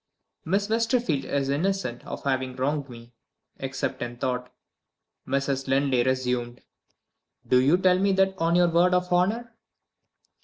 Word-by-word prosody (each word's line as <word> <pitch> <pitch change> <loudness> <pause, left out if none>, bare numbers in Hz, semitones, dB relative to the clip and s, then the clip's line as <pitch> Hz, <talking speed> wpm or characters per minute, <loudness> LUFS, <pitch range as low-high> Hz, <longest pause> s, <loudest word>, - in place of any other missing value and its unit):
"Miss 195 +4 0
Westerfield 225 - 0
is 140 -1 -1
innocent 150 -4 -1
of - - -6
having 130 -2 -1
wronged 140 +2 -2
me, 120 0 -12 0.4
except 135 0 -4
in 120 0 -5
thought," 125 0 -3 0.8
Mrs. 135 0 -1
Linley 135 -1 +2
resumed. 125 -1 -1 0.9
"Do 125 0 +4
you 145 +7 +4
tell 185 0 +3
me 200 +1 +2
that 190 0 +2
on 165 +1 +2
your 175 0 +4
word 175 +2 +3
of 180 0 0
honor?" 225 +6 0
140 Hz, 140 wpm, -26 LUFS, 130-180 Hz, 0.9 s, Do